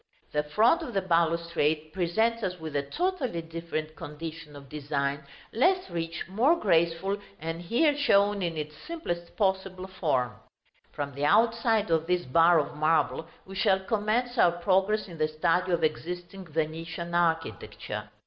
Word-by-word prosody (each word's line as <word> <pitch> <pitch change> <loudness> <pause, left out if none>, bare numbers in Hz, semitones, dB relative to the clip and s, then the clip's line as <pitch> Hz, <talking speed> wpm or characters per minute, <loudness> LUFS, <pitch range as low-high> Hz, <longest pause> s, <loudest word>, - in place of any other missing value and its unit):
The 150 - +1
front 220 - +3
of 265 -9 -6
the 195 - +2
balustrade 165 -3 +1
presents 220 +7 +1
us 180 -3 -3
with 160 -2 -6
a 145 - +2
totally 255 - -2
different 165 -1 -5
condition 155 0 -8
of 140 -1 -11
design, 140 -1 -2 0.3
less 365 - +2
rich, 165 0 -3
more 235 - +3
graceful, 170 - +1 0.2
and 165 +2 -4
here 265 - +2
shown 205 -7 +3
in 170 -3 -2
its 150 0 -5
simplest 175 - -6
possible 190 -2 0
form. 155 -10 -1 0.6
From 140 -1 -4
the 140 +2 -2
outside 225 +1 +3
of 165 0 +2
this 180 0 +1
bar 165 +6 +5
of 145 -1 -1
marble 160 +1 +1 0.2
we 195 - -10
shall 190 0 +3
commence 225 +4 0
our 170 - +6
progress 190 +4 +1
in 170 -3 -10
the 155 - +3
study 170 +4 +1
of 170 -2 +1
existing 175 +4 -3
Venetian 165 +2 -3
architecture. 165 - -1
170 Hz, 150 wpm, -28 LUFS, 155-200 Hz, 0.6 s, our